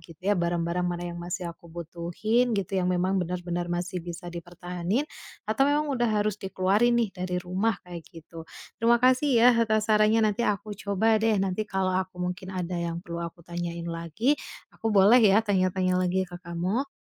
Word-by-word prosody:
gitu 165 Hz, 0 st, -15 dB
ya. 205 Hz, -, +3 dB
Barang-barang 170 Hz, 0 st, 0 dB
mana 175 Hz, 0 st, -3 dB
yang 170 Hz, -, -7 dB
masih 180 Hz, +1 st, -4 dB
aku 170 Hz, -, -18 dB
butuhin 175 Hz, +8 st, -1 dB
gitu, 195 Hz, -1 st, -3 dB
yang 180 Hz, -, 0 dB
memang 185 Hz, +1 st, +1 dB
benar-benar 175 Hz, 0 st, -3 dB
masih 175 Hz, +1 st, -3 dB
bisa 175 Hz, +1 st, -8 dB
dipertahanin, 175 Hz, -, -3 dB, 0.4 s
atau 270 Hz, +6 st, +2 dB
memang 295 Hz, 0 st, +1 dB
udah 240 Hz, -2 st, +1 dB
harus 210 Hz, -1 st, 0 dB
dikeluarin 200 Hz, +5 st, +2 dB
nih 225 Hz, -4 st, +1 dB
dari 180 Hz, -1 st, -3 dB
rumah, 190 Hz, +4 st, 0 dB
kayak 175 Hz, -1 st, -8 dB
gitu. 165 Hz, -1 st, -12 dB, 0.3 s
Terima 235 Hz, +1 st, +5 dB
kasih 255 Hz, +4 st, +3 dB, 0.2 s
ya 250 Hz, -, +8 dB
atas 215 Hz, -1 st, +2 dB
sarannya. 215 Hz, +1 st, +4 dB
Nanti 215 Hz, +2 st, 0 dB
aku 210 Hz, -2 st, -1 dB
coba 210 Hz, +2 st, +1 dB
deh. 220 Hz, -1 st, +2 dB
Nanti 195 Hz, +2 st, -1 dB
kalau 190 Hz, -1 st, 0 dB
aku 185 Hz, -1 st, -2 dB
mungkin 180 Hz, +1 st, -4 dB
ada 180 Hz, -2 st, -3 dB
yang 170 Hz, 0 st, -3 dB
perlu 170 Hz, 0 st, -5 dB
aku 170 Hz, 0 st, -7 dB
tanyain 170 Hz, -1 st, -5 dB
lagi, 170 Hz, -, -1 dB, 0.4 s
aku 225 Hz, -, -7 dB
boleh 205 Hz, +6 st, +7 dB
ya 215 Hz, 0 st, +5 dB
tanya-tanya 185 Hz, -2 st, +1 dB
lagi 185 Hz, +1 st, +1 dB
ke 175 Hz, -, -8 dB
kamu? 180 Hz, +9 st, -2 dB
185 Hz, 180 wpm, -27 LUFS, 175-215 Hz, 0.4 s, ya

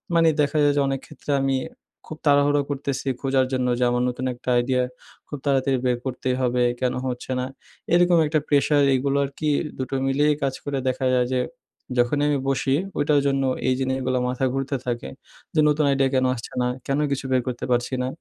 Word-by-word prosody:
মানে 165 Hz, 0 st, +5 dB
দেখা 145 Hz, +1 st, 0 dB
যায় 145 Hz, 0 st, +4 dB
যে 145 Hz, -, +3 dB
অনেক 135 Hz, 0 st, -1 dB
ক্ষেত্রে 150 Hz, 0 st, -7 dB
আমি 135 Hz, 0 st, +1 dB, 0.5 s
খুব 155 Hz, -, -8 dB
তাড়াহুড়া 145 Hz, 0 st, +4 dB
করতেছি 140 Hz, -1 st, -3 dB
খোঁজার 135 Hz, -1 st, +2 dB
জন্য 130 Hz, -1 st, 0 dB
যে -, -, +2 dB
আমার 120 Hz, 0 st, +1 dB
নতুন 125 Hz, +1 st, -4 dB
একটা 125 Hz, +1 st, -7 dB
idea 125 Hz, +1 st, +1 dB, 0.5 s
খুব 145 Hz, -, -6 dB
তাড়াতাড়ি 135 Hz, -1 st, +2 dB
বের 125 Hz, -1 st, +2 dB
করতেই 130 Hz, 0 st, -2 dB
হবে, 125 Hz, -1 st, +1 dB, 0.2 s
কেন 125 Hz, -1 st, +1 dB
হচ্ছে 125 Hz, +1 st, -5 dB
না, 125 Hz, -, -1 dB, 0.5 s
এরকম 175 Hz, 0 st, +5 dB
একটা 155 Hz, +1 st, +1 dB
প্রেশার 145 Hz, 0 st, +3 dB
এগুলো 140 Hz, +2 st, 0 dB
আর -, -, -6 dB
কি 155 Hz, -, 0 dB, 0.3 s
দুটো 130 Hz, +1 st, -3 dB
মিলিয়ে 145 Hz, +3 st, +2 dB
কাজ 135 Hz, -1 st, 0 dB
করে 145 Hz, -1 st, -2 dB
দেখা 130 Hz, +1 st, -1 dB
যায় 125 Hz, -1 st, +2 dB
যে 130 Hz, -, +2 dB, 0.6 s
যখনই 120 Hz, +4 st, +2 dB
আমি 145 Hz, -, +2 dB
বসি, 135 Hz, 0 st, +1 dB, 0.2 s
ওইটার 145 Hz, 0 st, +3 dB
জন্য 135 Hz, 0 st, +1 dB, 0.2 s
এই 130 Hz, -, +4 dB
জিনিসগুলো 130 Hz, -1 st, -1 dB
মাথা 125 Hz, +1 st, -1 dB
ঘুরতে 135 Hz, +1 st, -2 dB
থাকে, 120 Hz, -, -3 dB, 0.5 s
যে -, -, +3 dB
নতুন 150 Hz, 0 st, +2 dB
আইডিয়া 135 Hz, -1 st, +2 dB
কেন 130 Hz, 0 st, +3 dB
আসছে 115 Hz, -3 st, -8 dB
না, 125 Hz, -, +1 dB, 0.2 s
কেন 140 Hz, +1 st, 0 dB
কিছু 135 Hz, -1 st, -2 dB
বের 130 Hz, -1 st, +3 dB
করতে 125 Hz, -2 st, -3 dB
পারছি 120 Hz, +2 st, 0 dB
না। -, -, -1 dB
135 Hz, 200 wpm, -23 LUFS, 125-145 Hz, 0.6 s, মানে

